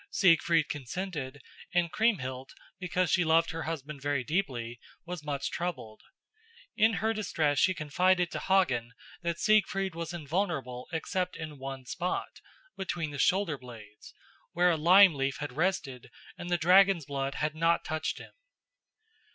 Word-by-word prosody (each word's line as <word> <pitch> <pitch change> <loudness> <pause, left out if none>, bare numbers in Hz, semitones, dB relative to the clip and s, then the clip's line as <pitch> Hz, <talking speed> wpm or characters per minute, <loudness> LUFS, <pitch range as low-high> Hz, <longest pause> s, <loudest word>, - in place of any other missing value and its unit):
Siegfried 165 -4 +3
consented, 145 -2 -5 0.3
and 170 -2 +2
Kriemhild, 135 - -1 0.3
because 180 0 0
she 180 - +3
loved 165 +1 +3
her 165 - -5
husband 150 -2 -6
very 145 -2 -1
deeply, 125 -8 -2 0.3
was 175 -3 -6
much 140 -2 -3
troubled. 170 -11 -5 0.7
In 220 0 +4
her 220 +4 0
distress 160 -9 0
she 185 -1 +3
confided 180 +4 +1
to - - -4
Hagen 125 -12 +1 0.3
that 170 -1 -2
Siegfried 195 -3 +2
was 170 +1 -5
invulnerable 155 -6 -3
except 180 +3 -2
in 155 -3 -7
one 135 -1 -7
spot, 180 +8 -4 0.3
between 175 -5 -3
the 145 - -7
shoulder 180 -3 +2
blades, 110 -4 -13 0.4
where 180 +1 +4
a - - +2
lime 180 +4 +7
leaf 135 -1 -2
had 145 -3 -5
rested 155 -7 -2 0.3
and 175 - -7
the 175 - +2
dragon's 180 -1 +5
blood 135 -1 -3
had 150 0 -1
not 165 +1 +1
touched 155 -1 -2
him. - - -11
165 Hz, 145 wpm, -29 LUFS, 140-180 Hz, 0.7 s, lime